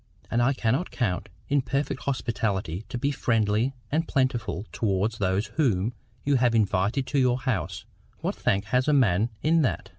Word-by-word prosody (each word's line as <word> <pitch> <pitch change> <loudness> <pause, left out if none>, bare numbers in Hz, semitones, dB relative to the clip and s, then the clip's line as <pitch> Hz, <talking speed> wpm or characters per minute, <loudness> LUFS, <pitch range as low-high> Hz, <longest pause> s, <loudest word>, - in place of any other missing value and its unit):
And 120 - +2
I 130 +3 +3
cannot 130 +7 0
count 105 -4 -2 0.2
it 140 -1 +2
perfect 135 +1 -2
hospitality 105 - -1
to - - -3
be 140 +4 0
friendly 115 0 +1 0.2
and 160 +3 +1
plentiful 120 - 0
towards 105 +1 0
those 95 +1 +1
whom 115 - +2 0.3
you 140 -1 +3
have 120 -2 +3
invited 105 +4 +1
to 140 +2 0
your 125 -1 +3
house—what 105 - -4
thank 100 - 0
has 125 +6 +1
a 150 - +4
man 110 -5 +3
in 160 +2 +4
that? 100 - -1
115 Hz, 160 wpm, -26 LUFS, 100-135 Hz, 0.3 s, a